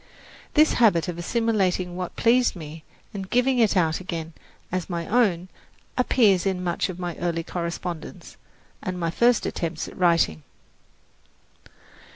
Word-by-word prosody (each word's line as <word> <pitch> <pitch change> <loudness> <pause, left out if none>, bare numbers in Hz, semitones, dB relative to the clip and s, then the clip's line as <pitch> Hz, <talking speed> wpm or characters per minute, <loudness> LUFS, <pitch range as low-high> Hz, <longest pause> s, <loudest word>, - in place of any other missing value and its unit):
This 310 +1 +5
habit 175 -9 +4
of 175 -1 -4
assimilating 185 -3 0
what 180 -1 -5
pleased 245 0 +3
me 155 -1 -9 0.3
and 195 -2 -6
giving 250 +1 +2
it 215 -4 +3
out 160 -3 +2
again 170 -3 -5 0.4
as 185 0 -3
my 170 -2 -3
own 195 -6 +2 0.5
appears 220 -7 +3
in 185 -1 -1
much 175 +2 -1
of 180 - -6
my 175 -2 -4
early 170 -1 -2
correspondence 170 -1 -6 0.5
and 185 -1 -4
my 165 -1 -1
first 235 +6 +3
attempts 165 -2 -3
at - - -11
writing. 170 - +2
180 Hz, 140 wpm, -24 LUFS, 170-210 Hz, 0.5 s, This